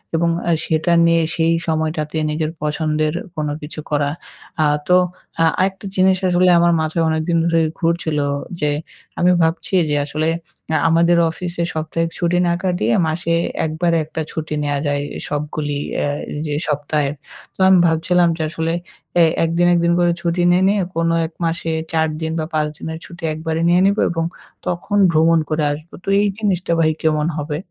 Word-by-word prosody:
এবং 170 +1 +2 0.2
আ - - +4
সেটা 160 +2 +1
নিয়ে 165 -1 +3
সেই 165 0 +2
সময়টাতে 155 -1 -1
নিজের 155 +1 -1
পছন্দের 150 0 0 0.2
কোনো 150 -1 -2
কিছু 150 +1 -8
করা। 145 -1 +1 0.5
আ - - +4 0.2
তো 180 0 +6 0.4
আ 165 - +5 0.2
আরেকটা 190 +1 -1
জিনিস 185 0 +4
আসলে 180 +1 +4
আমার 170 0 +4
মাথায় 160 +1 0
অনেকদিন 160 +2 0
ধরে 165 -1 +2 0.2
ঘুরছিলো 165 -3 0 0.3
যে, 150 0 +1 0.5
আমি 180 +1 +4
ভাবছি 165 +4 -1 0.2
যে 150 - +1
আসলে 155 +2 -1 0.5
আ - - +4
আমাদের 170 +1 +4
অফিসে 175 +1 -4
সপ্তাহিক 160 +1 -2
ছুটি 175 0 +1
না 170 - +2
কাটিয়ে, 175 - +1
মাসে 165 +1 -1 0.3
একবারে 165 +2 0
একটা 160 +1 -5
ছুটি 155 -1 -4
নেওয়া 145 -1 -1
যায়। 145 0 0 0.3
সবগুলি 145 0 -3 0.2
এ্যা 145 - 0 0.4
যে 150 - -2
সপ্তাহে। 145 -1 0 0.4
তো - - -33
আমি 190 - +7
ভাবছিলাম, 170 +2 +2
যে 160 - -2
আসলে 165 0 -2 0.5
এ - - +8 0.2
এক 165 - +1
দিন, 175 - +4
১ 175 - +3
দিন 170 - +3
করে 175 0 +3
ছুটি 170 +1 0
না 175 - +4
নিয়ে, 200 0 +2
কোনো 165 0 +1
১ 160 - -19
মাসে 165 0 -1 0.2
৪ 160 0 +2
দিন 160 0 -2
বা, 155 - -1
৫ 155 -1 +1
দিনের 160 0 -6
ছুটি 175 -1 -13
একবারে 160 +1 -3
নিয়ে 175 +1 +4
নেব। 200 +2 +2
এবং 165 -1 -1 0.4
তখন 180 +4 -1
ভ্রমণ 165 +1 +4
করে 155 0 0
আসবো। 155 +3 -10
তো - - -4
এই 210 - +2
জিনিসটা 190 -5 -1
ভাই 155 -1 +3
কেমন 155 -1 +1
হবে? 150 0 -3
165 Hz, 175 wpm, -19 LUFS, 155-175 Hz, 0.5 s, এ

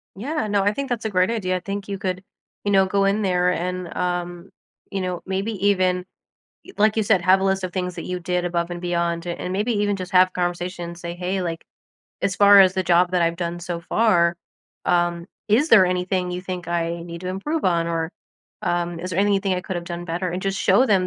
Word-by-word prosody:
Yeah. 255 - -2
No, 200 -1 +1
I 205 +1 +2
think 280 +2 -4
that's 235 -3 -2
a - - 0
great 185 -1 +2
idea. 185 -5 -1
I - - -4
think 200 +2 -5
you 200 - -3
could, 185 -1 -3 0.4
you 205 - 0
know, 195 -1 +5
go 200 +1 +1
in 200 +2 +2
there 180 -2 +2
and, 180 0 -3
um, 175 0 -3 0.4
you 195 - -2
know, 180 -1 -3
maybe 195 +4 -2
even 185 -2 +2 0.6
y 380 - -13
like, 215 +1 +3
you 220 - +3
said, 200 -3 +3
have 190 +1 +5
a - - 0
list 195 0 +1
of 180 - -4
things 180 -1 -3
that - - -6
you 180 0 -3
did 180 +1 -1
above 170 0 -1
and 175 0 -5
beyond, 170 -1 -1
and 175 +1 -4
maybe 210 +5 0
even 205 0 +1
just 185 -2 -6
have 185 0 +5
conversations, 175 -1 -3
say, 170 -1 -5
"Hey, 185 +2 -2
like, 165 -2 -4 0.6
as 195 - +1
far 200 -1 +8
as 185 -1 +5
the 190 - 0
job 175 +1 +4
that 180 - +2
I've 170 0 +1
done 175 -1 -3
so 175 -1 -4
far, 170 -4 +2 0.5
um, 175 -1 +1 0.2
is 260 +10 +3
there 200 -5 +8
anything 180 0 -1
you 180 - -3
think 180 -1 -6
I 170 0 -1
need 170 -1 -8
to 180 - -4
improve 270 - -2
on, 170 -2 +2
or, 165 0 -2 0.5
um, 175 -1 -1
is 180 +1 -5
there 175 - -2
anything 200 -1 +2
I 180 - -2
could 190 -1 -5
have 175 - -4
done 175 0 -6
better?" 175 +2 -2
And 180 +2 -4
just 195 0 -1
show 195 +6 +4
them 190 -4 +3
180 Hz, 235 wpm, -23 LUFS, 175-195 Hz, 0.6 s, far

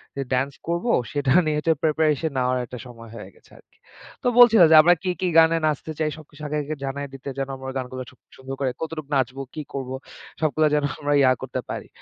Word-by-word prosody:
যে 140 - -3
ড্যান্স 135 +2 0
করব 170 +6 -2 0.3
সেটা 145 -2 0
নিয়ে 150 -1 0
যে 160 - +5
প্রিপারেশন 155 0 +1
নেওয়ার 125 0 +1
একটা 125 - -9
সময় 115 -1 -12
হয়ে 105 -4 -9
গেছে - - -25
আরকি। - - -27 0.5
তো - - +1
বলছিল 230 -4 +8
যে, - - +8
আমরা 175 +3 +5
কি, 185 - -1
কি 185 - +1
গানে 165 0 +5
নাচতে 155 +1 -2
চাই? 155 -1 +1
সবকিছু 150 -1 -15
আগে, 150 +1 -2
আগে 155 +2 -4
জানায় 140 +1 -4
দিতে 135 +1 -8
যেন, 135 -1 -2
আমরা 130 0 -6
গানগুলো 130 0 -5
সু - - -22 0.2
সুন্দর 135 0 -7
করে 135 -2 0
কতটুকু 155 -3 -5
নাচবো, 135 0 -1
কি 155 - -4
করব? 135 -2 -4 0.5
সবগুলা 155 0 +2
যেন 150 - +1 0.2
আমরা 145 0 0
ইয়া 130 -1 +5
করতে 130 -1 -4
পারি। - - -5
145 Hz, 215 wpm, -23 LUFS, 130-155 Hz, 0.5 s, বলছিল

